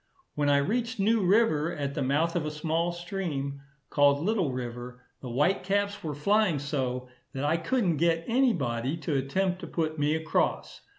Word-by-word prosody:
When 145 -1 +1
I 140 - +5
reached 230 - -1
New 215 +1 +3
River, 180 -5 +3
at 140 -4 -3
the 145 - -3
mouth 150 +6 +1
of 170 - 0
a 155 - -2
small 160 +3 -1
stream, 170 -6 -4 0.3
called 145 -1 +4
Little 185 -3 0
River, 125 0 -6 0.2
the 130 - -6
white 145 +11 +2
caps 200 +1 -1
were 150 -3 -3
flying 200 +2 +2
so, 130 -3 -2 0.3
that 135 +2 -2
I 155 +3 +2
couldn't 175 - 0
get 165 0 +2
any 255 +2 +3
body 130 - -2
to 155 -2 -2
attempt 180 +8 0
to - - -7
put 160 -2 -2
me 145 +1 +2
across. 160 0 -1
155 Hz, 180 wpm, -28 LUFS, 140-185 Hz, 0.3 s, I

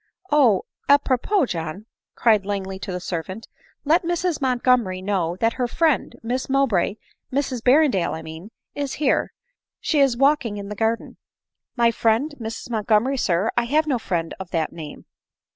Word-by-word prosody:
" - - -70
Oh! 255 -10 +4 0.3
a 285 - +8
propos, 280 - 0
John," 165 +4 -5 0.3
cried 215 -4 +3
Langley 195 -1 -4
to 190 - -5
the 180 - -3
servant, 185 +4 -5 0.2
" - - -35
let 320 +5 +4
Mrs 345 -1 -1
Montgomery 250 -7 +2
know 185 -3 -1
that 225 +4 +1
her 245 - +2
friend* 315 +2 +1
Miss 250 +4 -2
Mow 275 +1 +3
bray, 200 -3 0 0.3
Mrs 260 -2 -1
Berrendale 255 - +3
I 160 - -7
mean, 160 +5 -9 0.2
is 285 -2 -3
here 290 -2 +1 0.3
— - - -70
she 305 - 0
is 270 -4 +3
walking 275 -5 +2
in 200 0 -6
the 210 - -5
garden." 225 +2 -1 0.3
" - - -63
My 235 -1 +4
friend 230 +7 +1
Mrs 225 +1 -6
Montgomery, 220 +4 +1
sir! 190 -2 +1
I 240 - +2
have 305 +6 +2
no 270 -5 0
friend 170 -6 -2
of 190 -2 -7
that 165 -3 -1
name." 155 -3 -9
230 Hz, 180 wpm, -23 LUFS, 190-275 Hz, 0.3 s, a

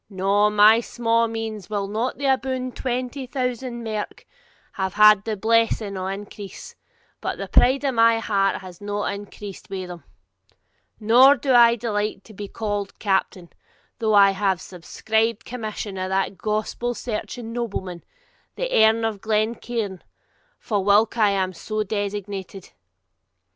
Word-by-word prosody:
No; 200 +2 +2
my 210 +2 +6
sma' 230 -1 +1
means, 225 -3 -5
whilk 200 -2 -2
are - - -7
not 240 +4 -2
aboon 265 -2 0
twenty 255 +2 -4
thousand 250 -1 -3
merk, 215 -2 -5 0.5
have 190 -1 -3
had 210 -1 +7
the 220 -2 -2
blessing 225 -1 +1
of 190 0 -3
increase, 200 0 -8 0.5
but - - -3
the - - -5
pride 265 +3 +3
of 275 -2 0
my 230 0 +5
heart 200 -3 0
has 185 -1 -12
not 205 0 -2
increased 200 -1 -9
with 185 -2 -5
them; 175 -1 -9 1.0
nor 245 +6 +6
do 265 0 0
I 235 -1 +7
delight 210 -3 -2
to 220 - -15
be 205 0 -7
called 205 -2 -4
captain, 190 -3 -1 0.5
though 220 -2 +2
I 200 -1 +7
have 195 -1 0
the 185 - -12
subscribed 220 +5 -2
commission 215 -4 -5
of 185 0 -3
that 195 +1 0
gospel 215 +4 -2
searching 225 0 -5
nobleman, 190 -7 -4 0.5
the - - -3
Earl 220 +1 +4
of 215 -3 -3
Glencairn, 220 -2 -2 0.6
fa 210 -3 -2
whilk 205 +4 +3
I 210 -2 +5
am 190 -2 0
so 215 +5 -3
designated. 200 -2 -5
215 Hz, 145 wpm, -23 LUFS, 195-230 Hz, 1.0 s, had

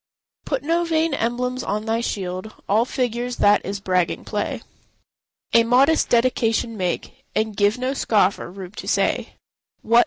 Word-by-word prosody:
Put 275 -2 -2
no 335 +3 +1
vain 325 -2 +1
emblems 250 +1 -1
on 210 +2 -2
thy 225 +1 0
shield; 190 -1 -4
All 220 +4 +3
figures—that 240 -4 +1
is 200 +1 -4
bragging 185 -2 0
play. - - -3 0.9
A 230 - +6
modest 265 +7 +3
dedication 230 -1 +1
make, 195 +7 -3
And 220 -1 0
give 205 +2 +2
no 255 +2 -1
scoffer 205 -9 +1
room 185 0 -9
to 210 - -9
say, - - 0 0.5
"What! 235 +2 +5
230 Hz, 145 wpm, -22 LUFS, 205-255 Hz, 0.9 s, A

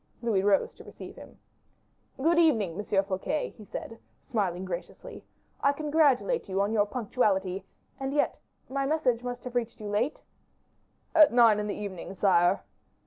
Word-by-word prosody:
Louis 220 -5 +2
rose 195 0 +2
to - - -14
receive - - -11
him. - - -13 0.8
"Good 330 +5 +3
evening, 235 - +3
M. 200 0 0
Fouquet," 195 +10 -2
he 215 - -12
said, 225 +2 -7 0.3
smiling 190 -7 -1
graciously; 175 -1 -7 0.4
"I 280 - +3
congratulate 300 - +2
you 190 0 -1
on 200 +2 +1
your 210 -2 +3
punctuality; 200 -5 0 0.3
and 270 0 -3
yet 290 +1 0 0.3
my 275 +1 -1
message 270 -6 +1
must 245 0 -5
have 250 - -7
reached 240 -1 -2
you 210 -1 -6
late?" 225 +8 -1 0.9
"At 310 -3 +7
nine 230 -3 +5
in 210 - -2
the 205 - -3
evening, 195 -2 -6
sire." 185 -1 +3
225 Hz, 155 wpm, -28 LUFS, 195-270 Hz, 0.9 s, At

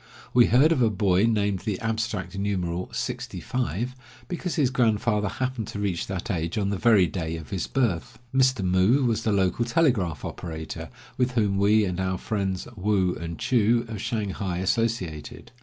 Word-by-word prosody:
We 120 -1 +6
heard 135 +7 +5
of 150 -6 +2
a 115 - +4
boy 100 0 +2
named 100 -4 +1
the 105 -3 -3
abstract 110 -3 -2
numeral, 90 -3 -2
"sixty - - -4
five," 125 -1 -2 0.3
because 180 0 -3
his 135 -5 +2
grandfather 110 -4 +1
happened 130 -1 -3
to 100 - -6
reach 95 -4 -1
that 95 +4 -3
age 85 -1 -2
on 100 -1 0
the 100 - -1
very 110 -6 +5
day 85 -4 -3
of 80 - -10
his 95 -4 -2
birth. 120 -3 -1 0.2
Mr. 130 -6 +3
Moo 95 +9 +3
was 115 -2 +1
the 110 - 0
local 95 +3 +2
telegraph 120 - +1
operator, 80 -1 -6 0.3
with 125 0 +1
whom 105 -5 +1
we, 105 +2 +4
and 90 -1 -3
our 95 0 -1
friends 95 -3 -2
Woo 95 -2 +1
and 85 -1 -6
Choo, 120 0 +2
of 110 -3 -6
Shanghai, 100 -5 -2
associated. 95 - -2
105 Hz, 175 wpm, -26 LUFS, 95-120 Hz, 0.3 s, We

